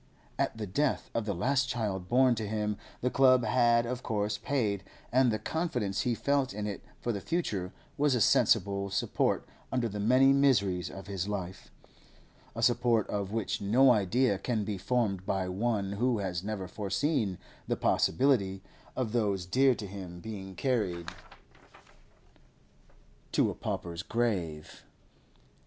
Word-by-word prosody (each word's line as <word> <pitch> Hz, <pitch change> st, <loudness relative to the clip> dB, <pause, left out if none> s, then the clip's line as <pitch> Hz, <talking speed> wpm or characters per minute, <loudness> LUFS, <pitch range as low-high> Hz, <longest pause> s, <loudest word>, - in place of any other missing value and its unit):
At -, -, 0 dB
the 110 Hz, -, -3 dB
death 135 Hz, +9 st, -1 dB
of 115 Hz, -, -1 dB
the 100 Hz, -, -1 dB
last 130 Hz, +7 st, +1 dB
child 105 Hz, -7 st, -2 dB
born 130 Hz, +1 st, +5 dB
to 110 Hz, -2 st, -3 dB
him 105 Hz, 0 st, -1 dB, 0.3 s
the 125 Hz, -, 0 dB
club 130 Hz, -3 st, +5 dB
had 120 Hz, +1 st, +3 dB
of 125 Hz, +1 st, -4 dB
course 105 Hz, -1 st, -1 dB
paid, 110 Hz, -6 st, -1 dB, 0.3 s
and 130 Hz, -1 st, +4 dB
the 110 Hz, -, 0 dB
confidence 120 Hz, -, -2 dB
he 120 Hz, -2 st, 0 dB
felt 140 Hz, -3 st, 0 dB
in 105 Hz, 0 st, -3 dB
it 105 Hz, -1 st, -5 dB, 0.2 s
for 120 Hz, -, -2 dB
the 100 Hz, -3 st, -4 dB
future 100 Hz, -, -2 dB, 0.3 s
was 145 Hz, -2 st, +3 dB
a -, -, +1 dB
sensible 100 Hz, -1 st, +3 dB
support 95 Hz, -, 0 dB, 0.2 s
under 125 Hz, -2 st, 0 dB
the 105 Hz, -1 st, -5 dB
many 130 Hz, +6 st, +5 dB
miseries 100 Hz, -, +2 dB
of 95 Hz, -, -9 dB
his 95 Hz, -2 st, -3 dB
life, 95 Hz, -2 st, -5 dB, 0.9 s
a -, -, -3 dB
support 115 Hz, -3 st, +3 dB
of 100 Hz, -1 st, -2 dB
which 110 Hz, -3 st, -2 dB
no 125 Hz, +6 st, +5 dB
idea 110 Hz, 0 st, +2 dB
can 110 Hz, 0 st, -1 dB
be 100 Hz, -2 st, -3 dB
formed 105 Hz, -4 st, 0 dB
by 95 Hz, -1 st, 0 dB
one 100 Hz, +1 st, -1 dB
who 120 Hz, +4 st, +1 dB
has 95 Hz, -3 st, -3 dB
never 100 Hz, -3 st, -4 dB
foreseen 100 Hz, -, -1 dB, 0.3 s
the -, -, 0 dB
possibility 95 Hz, -, +2 dB, 0.3 s
of 125 Hz, -4 st, -2 dB
those 100 Hz, -6 st, 0 dB
dear 130 Hz, +7 st, +3 dB
to 105 Hz, -, -6 dB
him 95 Hz, -3 st, -8 dB
being 95 Hz, -2 st, -7 dB
carried 95 Hz, -8 st, -1 dB, 2.2 s
to -, -, +3 dB
a -, -, -5 dB
pauper's 85 Hz, 0 st, -4 dB
grave. 90 Hz, -10 st, -2 dB
105 Hz, 150 wpm, -30 LUFS, 95-125 Hz, 2.2 s, born